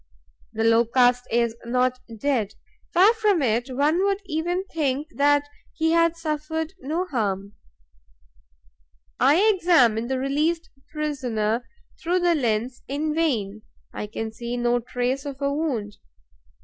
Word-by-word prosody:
The 225 0 -2
Locust 245 +2 +3
is 235 -1 +1
not 250 +1 0 0.2
dead, 230 -6 0 0.4
far 385 +5 +6
from 420 -8 +2
it; 240 +2 0
one 295 +8 +1
would 395 0 +1
even 350 +2 -1
think 295 -1 -1
that 290 0 +3 0.3
he 320 0 +1
had 335 0 +3
suffered 320 +1 -3
no 330 +5 -2
harm. 200 - -2 1.7
I 275 +4 +5 0.2
examine 250 - +3
the 265 +1 -1
released 305 +5 -1 0.2
prisoner 250 -7 -2 0.3
through 355 +2 +1
the 350 -1 +3
lens 240 -3 -1
in 300 +3 -2
vain; 225 -11 -1 0.3
I 210 - -5
can 220 +1 -5
see 235 +2 -5
no 240 0 +2
trace 250 +3 -2
of 280 -2 -7
a 280 0 0
wound. 250 -10 -2
275 Hz, 130 wpm, -24 LUFS, 235-320 Hz, 1.7 s, far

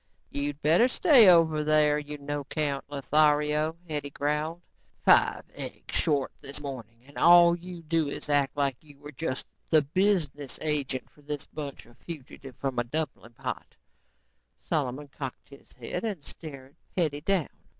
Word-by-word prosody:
"You'd 145 0 -3
better 165 - +5
stay 255 - +7
over 160 -3 +5
there, 150 -1 +4
you 150 0 -7
no 145 +1 -3
account 140 0 -2
Lothario," 150 +2 +2
Hetty 150 -2 -3
growled. 150 +4 -2 0.4
"Five - - +5
eggs - - -8
short 145 -5 +1
this 140 +2 -7
morning 120 -5 -8
and 145 - -10
all 170 0 +8
you 175 -1 -9
do 160 -2 +1
is - - -6
act 145 -1 +1
like 140 -3 +1
you 145 -2 -17
were 145 +1 -10
just 135 -2 -3 0.2
the 155 -2 +5
business 150 -4 0
agent 145 -4 -1
for 150 - -22
this 145 -1 -5
bunch 145 -3 -7
of 120 0 -20
fugitives 135 -4 -9
from 135 -3 -2
a - - +2
dumpling 125 -3 -4
pot." - - -6 0.8
Solomon 145 -1 -2
cocked 135 -2 -8
his 140 -1 -16
head - - -5
and 200 -10 -4
stared 140 -4 -9 0.2
Hetty 150 -5 0
down. 180 -2 +1
150 Hz, 155 wpm, -28 LUFS, 140-160 Hz, 0.8 s, all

